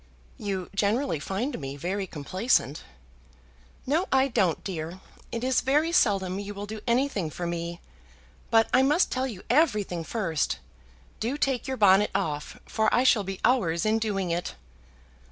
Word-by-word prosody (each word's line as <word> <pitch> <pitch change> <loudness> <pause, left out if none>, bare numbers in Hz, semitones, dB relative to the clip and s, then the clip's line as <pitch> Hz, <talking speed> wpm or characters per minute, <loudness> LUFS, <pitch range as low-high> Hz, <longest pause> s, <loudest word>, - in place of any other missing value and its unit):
"You 190 -3 -3
generally 205 - +1
find 230 - -3
me 135 -1 -6
very 190 +6 -2
complaisant." 165 - 0 1.0
"No 315 +8 +1
I 270 +1 +4
don't, 185 -8 +1
dear. 170 -1 -5 0.3
It 230 0 -3
is 260 0 +2
very 300 +5 +2
seldom 195 - +2
you 205 0 -6
will 200 +1 -5
do 215 +1 -7
anything 235 - +1
for 175 +3 -5
me. 170 0 -4 0.7
But 225 0 +4
I 255 - +6
must 295 +7 +3
tell 260 +1 0
you 210 -8 -8
everything 215 - +2
first. 165 -6 -1 0.6
Do 245 +6 -1
take 270 -4 0
your 265 0 -2
bonnet 205 0 +5
off, 150 -7 -2
for 220 -1 +1
I 245 - +3
shall 230 -5 +4
be 195 0 -5
hours 175 -10 +2
in 220 +1 +2
doing 195 -5 -1
it." 175 +1 -2
205 Hz, 155 wpm, -27 LUFS, 180-250 Hz, 1.0 s, I